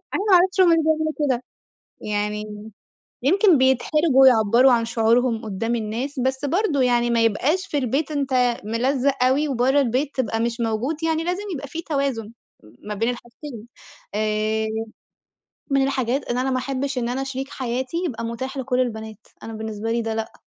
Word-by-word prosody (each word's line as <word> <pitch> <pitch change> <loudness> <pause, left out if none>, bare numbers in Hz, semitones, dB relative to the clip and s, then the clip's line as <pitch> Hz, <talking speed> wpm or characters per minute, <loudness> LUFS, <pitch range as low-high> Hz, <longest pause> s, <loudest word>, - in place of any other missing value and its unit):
أنا - - 0
ما - - +6
اعرفش 375 +2 +3
هُم 365 - +6
ليه 325 - +3
بيعملوا 315 0 +1
كده، 260 -4 0 0.6
يعني 210 0 -4 0.5
يمكن 370 - +4
بيتحرجوا 265 +2 +4
يعَبَّروا 240 +2 +5
عن 230 -1 +2
شعورهُم 230 +1 +1
قدام 225 +3 -2
الناس، 235 +6 -4
بس 265 +2 -1
برضه 325 -4 +1
يعني 240 -1 +2
ما 230 -1 +2
يبقاش 300 - +1
في 295 - -2
البيت 275 +4 -1
أنت 260 -4 +1
ملزق 255 +4 0
أوي 280 +4 +2
وبرّه 265 +2 +2
البيت 270 +3 0
تبقى 225 -3 -1
مش 235 +1 -2
موجود، 235 +7 -1
يعني 325 0 0
لازم 360 +4 -2
يبقى 280 -1 -6
في 330 +3 -5
توازن 275 -8 -2 0.5
ما 210 - -4
بين 225 +3 0
الحاجتين. 240 0 -9 0.5
آآ، 215 +1 0 1.0
من 275 0 +3
الحاجات 270 0 -1
إن 240 - 0
أنا 265 +1 0
ما 255 - 0
احبش 270 +1 -2
إن 235 - -1
أنا 260 +2 -2
شريك 270 +1 -5
حياتي 255 +3 -3
يبقى 230 -5 -4
متاح 245 +4 -5
لكُل 255 -1 -1
البنات، 220 -3 -4 0.2
أنا 225 - -7
بالنسبة 220 0 -4
لي 235 0 0
ده 225 0 -3
لأ، 220 0 -4
255 Hz, 170 wpm, -22 LUFS, 225-280 Hz, 1.0 s, ما